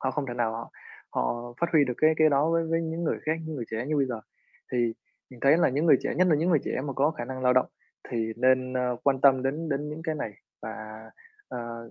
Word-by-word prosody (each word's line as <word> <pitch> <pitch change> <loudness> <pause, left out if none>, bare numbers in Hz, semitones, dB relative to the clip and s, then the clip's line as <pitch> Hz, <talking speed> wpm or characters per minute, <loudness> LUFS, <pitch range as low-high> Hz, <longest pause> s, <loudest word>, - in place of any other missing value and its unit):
Họ 130 - 0
không 140 +1 -3
thể 120 - -4
nào 120 -2 0
họ 115 +1 -6 0.4
họ 120 - -2
phát 170 - +3
huy 155 -3 +6
được 125 -2 -3
cái 155 0 +4
cái 155 0 +5
đó 145 +3 +2
với 165 0 +2
với 165 0 +1
những 165 +1 -3
người - - 0
khác, 155 - +3
những 155 -2 -5
người 120 - -4
trẻ 115 +3 -3
như 150 0 0
bây 135 -2 +2
giờ. 120 -3 -4 0.5
Thì 120 -2 +1 0.4
mình 125 -2 -14
thấy 140 +4 +5
là 175 - +4
những 145 +6 0
người 145 - +7
trẻ, - - -2
nhất 185 - +4
là 160 - +5
những 165 +5 +1
người 155 -6 +4
trẻ - - -2
mà 140 - -3
có 140 +4 +2
khả 135 -7 -5
năng 130 +1 -6
lao 125 - +4
động 130 0 +3 0.4
thì 115 -1 -1
nên, 130 +1 +2
ơ, 125 -1 0
quan 135 -1 +2
tâm 135 -2 +5
đến 150 +5 -2
đến 145 0 -2
những 155 +2 -7
cái 160 -2 -1
này 125 -8 -4 0.3
và, - - -5 0.8
ờ, 115 -1 -7
135 Hz, 265 wpm, -27 LUFS, 120-155 Hz, 0.8 s, người